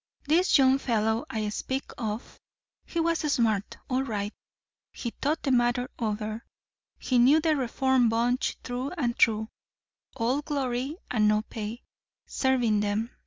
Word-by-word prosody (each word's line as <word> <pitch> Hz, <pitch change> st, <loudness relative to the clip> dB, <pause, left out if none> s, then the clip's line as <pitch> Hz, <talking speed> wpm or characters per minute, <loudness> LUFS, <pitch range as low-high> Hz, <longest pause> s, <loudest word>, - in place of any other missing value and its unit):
This 335 Hz, +6 st, +4 dB
young 265 Hz, 0 st, +5 dB
fellow 220 Hz, -3 st, 0 dB
I 215 Hz, -1 st, -2 dB
speak 265 Hz, +5 st, -4 dB
of 220 Hz, 0 st, -5 dB, 0.5 s
he 340 Hz, -, -3 dB
was 330 Hz, 0 st, +1 dB
smart, 220 Hz, -6 st, 0 dB
all 255 Hz, 0 st, 0 dB
right. 210 Hz, -5 st, -3 dB, 0.6 s
He 235 Hz, -, -5 dB
thought 295 Hz, +6 st, -2 dB
the 275 Hz, -, +1 dB
matter 245 Hz, 0 st, +2 dB
over. 215 Hz, 0 st, -3 dB, 0.5 s
He 250 Hz, -2 st, +1 dB
knew 270 Hz, +6 st, +6 dB
the 315 Hz, -1 st, +2 dB
reform 260 Hz, -1 st, +2 dB
bunch, 240 Hz, +3 st, 0 dB
through 250 Hz, +4 st, -4 dB
and 240 Hz, -6 st, 0 dB
through. 220 Hz, -1 st, +3 dB, 0.7 s
All 255 Hz, +3 st, 0 dB
glory 275 Hz, 0 st, -2 dB
and 215 Hz, -3 st, +3 dB
no 210 Hz, 0 st, +3 dB
pay, 220 Hz, +2 st, -6 dB, 0.4 s
serving 245 Hz, -5 st, +1 dB
them. 210 Hz, +3 st, -1 dB
240 Hz, 140 wpm, -27 LUFS, 220-265 Hz, 0.7 s, knew